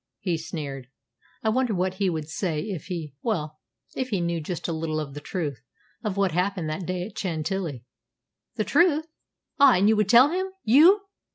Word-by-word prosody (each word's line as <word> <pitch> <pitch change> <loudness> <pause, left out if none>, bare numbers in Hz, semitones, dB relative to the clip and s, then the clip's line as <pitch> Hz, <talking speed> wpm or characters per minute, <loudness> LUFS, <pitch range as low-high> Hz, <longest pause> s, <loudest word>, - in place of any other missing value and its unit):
he 180 -4 -1
sneered. 150 -6 -6 0.6
"I 220 - +2
wonder 245 -1 +1
what 185 +1 0
he 195 - +3
would 160 -3 -3
say 160 -1 -2
if 190 -6 -5
he 165 -6 -5
well, 155 -9 -2 0.4
if 260 -1 -2
he 200 -5 0
knew 170 -1 -1
just 170 +2 -4
a 170 - -2
little 160 -1 -2
of 145 -3 -5
the 145 - -6
truth, 145 - -4 0.4
of 205 -3 -2
what 195 -2 +2
happened 180 0 -1
that 175 +3 -4
day 180 -1 -2
at 205 - -11
Chantilly?" 160 - -3 0.7
"The 215 - 0
truth! 315 - +3 0.5
Ah, 280 -2 +8
and 190 +3 +3
you 220 - +5
would 210 -2 +1
tell 245 +5 +8
him 375 +2 -1 0.2
you!" 325 - +6
180 Hz, 190 wpm, -25 LUFS, 155-215 Hz, 0.7 s, Ah